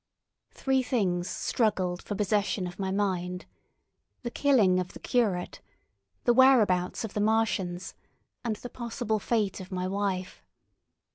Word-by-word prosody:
Three 265 -1 +1
things 190 -9 0
struggled 190 -6 0
for 205 - -5
possession 205 -1 0
of 180 +2 -8
my 190 -1 -1
mind: 185 -2 -1 0.8
the 240 - -3
killing 220 -12 +4
of 180 0 -4
the - - -10
curate, 205 -8 0 0.6
the 240 - +4
whereabouts 230 -10 +4
of 220 - -5
the 210 - -1
Martians, 205 -5 0 0.5
and 230 -3 -1
the 245 - -8
possible 235 -2 -2
fate 210 -2 0
of 185 0 -9
my 185 0 -2
wife. 190 -1 -2
205 Hz, 135 wpm, -28 LUFS, 185-230 Hz, 0.8 s, killing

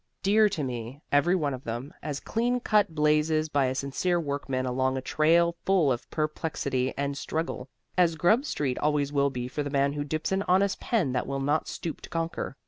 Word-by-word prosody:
Dear 210 +2 +5
to 190 -7 -3
me, 125 +1 -5
every 155 +6 +4
one 150 -6 0
of 130 0 -7
them, 120 +5 -5
as 145 -2 -4
clean 245 +2 0
cut 210 -8 +2
blazes 155 +1 +2
by 140 -2 +2
a 130 0 -1
sincere 140 +7 0
workman 140 -4 -2
along 130 +1 0
a - - 0
trail 170 +5 +3
full 180 -8 +3
of 120 - -3
perplexity 150 -4 -1
and 140 0 -1
struggle, 145 -3 -3 0.3
as 175 -3 +3
Grub 175 - +3
Street 140 - -2
always 150 -1 +1
will 140 -1 +3
be 125 -2 -4
for 140 +4 -3
the 145 - -3
man 140 0 +1
who 145 0 -2
dips 155 +4 -3
an 190 0 +1
honest 195 +2 +3
pen 205 - 0
that 125 - -1
will 140 0 -2
not 145 +3 0
stoop 165 - -5
to - - -10
conquer. 165 -4 -3
150 Hz, 205 wpm, -27 LUFS, 135-170 Hz, 0.3 s, Dear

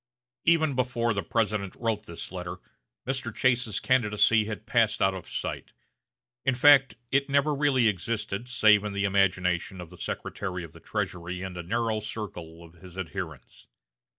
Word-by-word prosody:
Even 160 -3 +4
before 120 -2 0
the 100 - -1
President 105 0 -1
wrote 115 -3 -2
this 85 0 -8
letter, 90 -1 -5 0.5
Mr. 135 +2 -2
Chase's 125 -5 +1
candidacy 115 -3 +3
had 110 0 -6
passed 115 -1 +2
out 95 0 +3
of 95 -2 -8
sight. - - -5 0.7
In 130 - +2
fact, 135 +1 +6 0.2
it 140 +1 +2
never 140 +2 +3
really 140 -4 +3
existed 105 +3 -2
save 110 -4 +5
in 105 -1 -4
the 100 0 0
imagination 95 -2 +1
of 90 -1 -9
the 90 - -14
Secretary 90 -3 -4
of 80 -2 -10
the - - -13
Treasury 90 +1 -4
and 95 -1 -6
a 90 - -4
narrow 110 +4 -1
circle 90 -7 -7
of 85 -1 -15
his 90 -1 -12
adherents. 85 -7 -7
105 Hz, 160 wpm, -27 LUFS, 90-120 Hz, 0.7 s, fact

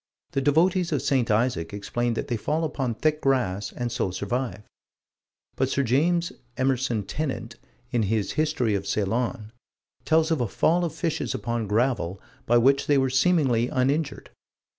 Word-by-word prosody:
The 135 - 0
devotees 170 +5 +2
of 150 - 0
St. 130 -4 +1
Isaac 105 -5 0
explain 120 +3 -2
that - - -3
they 120 - -1
fall 150 +9 -1
upon 135 -6 -2
thick 155 +6 0
grass 115 -8 0
and 120 -1 -4
so 95 - -1
survive: 105 +4 -3 0.9
but 130 0 0
Sir 140 - +1
James 165 +8 +1 0.2
Emerson 130 -4 0
Tennant, 125 -2 -4 0.3
in 120 -3 +1
his 105 -1 0
History 150 -8 0
of 100 - -2
Ceylon, 110 +2 -1 0.5
tells 160 +3 +2
of 160 -5 +1
a 120 - +1
fall 170 - +2
of 170 - -1
fishes 165 -4 -2
upon 120 -3 -2
gravel, 105 -4 0 0.3
by 120 - +5
which 135 +4 +3
they 145 - +4
were 130 -1 +2
seemingly 130 -5 +3
uninjured. 140 +4 -1
130 Hz, 160 wpm, -25 LUFS, 115-150 Hz, 0.9 s, by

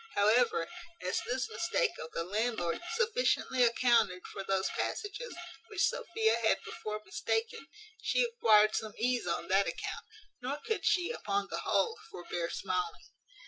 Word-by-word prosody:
However, 215 -4 +3 0.4
as 185 - 0
this 255 +1 0
mistake 380 +7 0
of 160 - -6
the 165 - -2
landlord 205 -2 -1
sufficiently 465 - +1
accounted 230 -6 +3
for 195 - -6
those 195 0 +1
passages 430 +4 -3 0.3
which 410 -3 +1
Sophia 225 -8 +1
had 225 -1 +3
before 215 0 -5
mistaken, 225 +7 -2 0.3
she - - +2
acquired 220 - +5
some 215 -1 -3
ease 245 -2 +1
on 170 0 -1
that 195 +1 +4
account; - - -4 0.3
nor 265 +4 -2
could 445 +7 -2
she, 355 +4 +3
upon 405 -4 -2
the - - -2
whole, 455 -1 +1
forbear 175 - -4
smiling. 430 0 -3
235 Hz, 140 wpm, -32 LUFS, -, 0.4 s, acquired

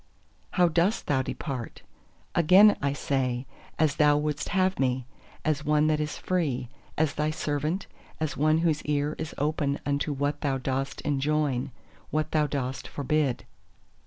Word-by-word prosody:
"How 180 -2 +4
dost 170 +6 +1
thou 135 -2 +2
depart?" 130 -2 -5 0.5
Again 185 +5 +7
I 140 -1 +1
say, 130 -3 -1 0.3
as 155 -3 +2
Thou 150 -1 +5
wouldst 150 -1 -2
have 190 0 +1
me; 130 -1 +1 0.4
as 155 -1 +1
one 150 0 +3
that 155 -1 +2
is 150 0 -2
free, 150 -10 -1 0.3
as 150 -2 +2
Thy 150 +1 0
servant, 155 +4 -2 0.3
as 155 -3 -2
one 155 +2 +3
whose 155 -2 +2
ear 145 0 0
is 160 - -5
open 145 -1 0
unto 145 +1 0
what 145 +1 -1
Thou 135 -2 0
dost 135 +1 -3
enjoin, 145 -2 0 0.4
what 155 0 -1
Thou 150 -1 +2
dost 135 -2 -3
forbid. 145 -2 -1
150 Hz, 150 wpm, -27 LUFS, 140-155 Hz, 0.5 s, Again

